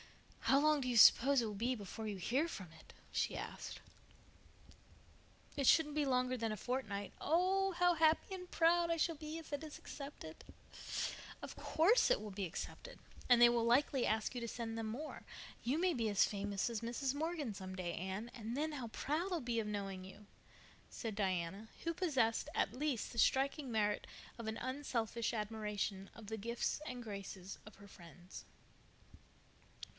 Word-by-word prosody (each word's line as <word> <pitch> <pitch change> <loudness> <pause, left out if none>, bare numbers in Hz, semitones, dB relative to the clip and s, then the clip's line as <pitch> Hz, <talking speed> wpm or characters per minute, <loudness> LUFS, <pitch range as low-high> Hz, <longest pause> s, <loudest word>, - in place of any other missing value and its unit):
"How 275 - +6
long 305 0 +4
do 255 - -1
you 240 - +1
suppose 270 +4 +8
it - - -1
will 215 - -3
be 235 +5 0
before 215 +1 -6
you 205 -2 -3
hear 260 - +1
from 190 - -7
it?" - - -16 0.2
she - - 0
asked. - - -6 1.8
"It 280 - 0
shouldn't 300 +1 +5
be 300 - +2
longer 255 -1 +2
than 225 -2 -1
a 215 - -3
fortnight. 210 -5 -3
Oh, 375 +4 +3
how 355 0 +4
happy 320 +3 +3
and 360 -1 -9
proud 340 +1 +4
I 335 - +1
shall 330 +1 +1
be 310 +1 -6
if 320 -2 -9
it 290 - -2
is 305 -1 -7
accepted!" 275 - -9 1.0
"Of - - -7
course 395 +13 +4
it - - +4
will 215 - -6
be 195 0 -3
accepted, - - -7 0.3
and 245 -1 +7
they 240 - +11
will 235 -1 +2
likely 255 +2 +3
ask 220 +2 0
you 245 - -3
to 235 - -3
send 225 -1 -4
them 225 -1 -2
more. 270 +8 -5 0.4
You 260 +5 +1
may 360 +1 +2
be 230 -5 0
as 205 -1 +5
famous 200 0 -1
as 230 -2 -3
Mrs. 245 +3 -1
Morgan 305 -5 -2
some 190 -1 -7
day, 175 -2 -3
Anne, 190 +6 -4
and 230 0 -5
then 310 +1 -1
how 260 -5 -4
proud 310 - -2
I'll 350 - +1
be 240 -4 -1
of 215 - -2
knowing 195 -3 -3
you," 190 +2 -12 0.6
said 225 -4 -5
Diana, 190 +1 -1
who 335 - 0
possessed, 270 -11 +1
at - - +1
least, 265 -3 -1
the 235 - -3
striking 270 +1 +2
merit 210 -2 +1 0.3
of 230 - -5
an 220 - -2
unselfish 240 -4 -2
admiration 210 -3 -2
of 225 - -11
the 220 +1 -3
gifts 235 +7 -2
and 245 -1 -5
graces 195 -3 -7
of 215 - -12
her 200 0 -14
friends. 175 -1 -12
235 Hz, 180 wpm, -37 LUFS, 210-295 Hz, 1.8 s, they